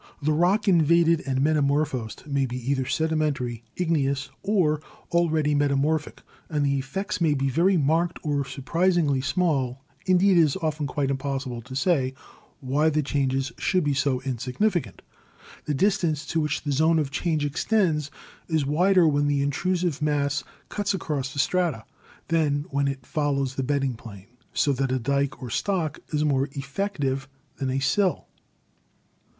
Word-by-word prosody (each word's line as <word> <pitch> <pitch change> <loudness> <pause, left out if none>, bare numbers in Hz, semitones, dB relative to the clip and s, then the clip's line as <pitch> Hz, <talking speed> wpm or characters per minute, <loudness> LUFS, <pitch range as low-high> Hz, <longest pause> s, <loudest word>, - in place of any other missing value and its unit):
The 155 +1 +1
rock 180 +8 +2
invaded 170 -2 +4
and 130 -1 0
metamorphosed 145 -5 0
may 140 -2 0
be 125 0 -5
either 130 -2 0
sedimentary, 150 -7 -1
igneous, 140 -6 0
or 180 -7 +1 0.3
al 170 0 +3
ready 155 -2 +1
metamorphic, 145 +2 0 0.3
and 150 -2 0
the 140 0 +1
effects 180 +9 -4
may 155 -3 +3
be 135 0 0
very 180 +7 +3
marked 165 +3 +1
or 145 -2 0
surprisingly 150 +1 +1
small; 135 -6 0 0.2
indeed, 185 0 +5
it - - +8
is 150 -4 +2
often 155 -2 -1
quite 140 0 -1
impossible 135 -3 -3
to 130 +3 -10
say 135 -5 +1 0.5
why 140 +4 +2
the 155 0 0
changes 135 -1 0
should 185 -2 +1
be 145 -1 +1
so 130 -1 0
insignificant. 130 - -1 0.6
The 150 - -1
distance 165 -4 +1
to 165 +2 -1
which 150 -1 -1
the 145 - -2
zone 160 +4 +3
of 145 -3 -1
change 155 0 0
extends 155 -1 +1 0.4
is 160 -4 +1
wider 175 +4 +4
when 145 -1 +2
the 140 -1 +1
intrusive 170 +2 -1
mass 145 -2 0 0.3
cuts 205 -1 -1
across 145 -7 -3
the 140 - -10
strata 150 -4 0 0.4
than 150 -3 +1
when 140 0 +1
it 135 -2 -4
follows 140 -4 -1
the 135 - -2
bedding 135 -1 0
plane, 105 -4 -12 0.2
so 140 - +2
that 135 0 -1
a 130 - +1
dyke 140 +2 -1
or 120 - -6
stock 175 - -1
is 150 -1 +1
more 140 -1 +1
effective 140 -2 -2 0.3
than 135 -2 -2
a 130 - 0
sill. 180 +8 +1
145 Hz, 155 wpm, -25 LUFS, 135-165 Hz, 0.6 s, it